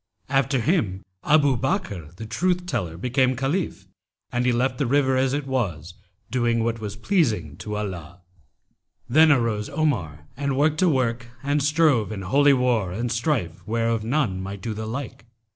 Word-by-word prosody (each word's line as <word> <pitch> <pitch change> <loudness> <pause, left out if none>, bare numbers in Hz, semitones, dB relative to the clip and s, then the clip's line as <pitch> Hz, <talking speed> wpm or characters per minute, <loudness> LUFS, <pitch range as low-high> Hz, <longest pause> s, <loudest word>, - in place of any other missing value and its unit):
After 135 -1 +2
him 115 - 0 0.2
Abu 145 -3 +4
Bakr[FN#287] 105 - -3
the 110 - -7
Truth 180 +11 0
teller 95 - -3
became 130 +5 +1
Caliph 135 - -2 0.5
and 125 0 0
he - - +4
left 125 +1 0
the 140 - +1
river 135 0 +2
as 130 0 +1
it 145 0 -2
was, 95 - -2 0.4
doing 120 -2 +1
what 115 0 -1
was 105 -2 -5
pleasing 110 - 0
to 105 -1 -5
Allah. 90 -4 -6 0.9
Then 155 +6 +6
arose 115 -6 +1
Omar 95 - -1
and 140 0 -2
worked 155 +3 +2
a 185 - +5
work 120 -4 0 0.2
and 145 +1 +1
strove 150 -7 +3
in 100 -2 -5
holy 140 +9 +4
war 125 -8 +1
and 115 +5 -2
strife 115 - -1
where 115 +1 0
of 115 -2 0
none 115 -6 0
might 95 +1 -6
do 115 - -3
the 110 +1 -5
like. 125 0 -6
120 Hz, 170 wpm, -24 LUFS, 105-140 Hz, 0.9 s, Then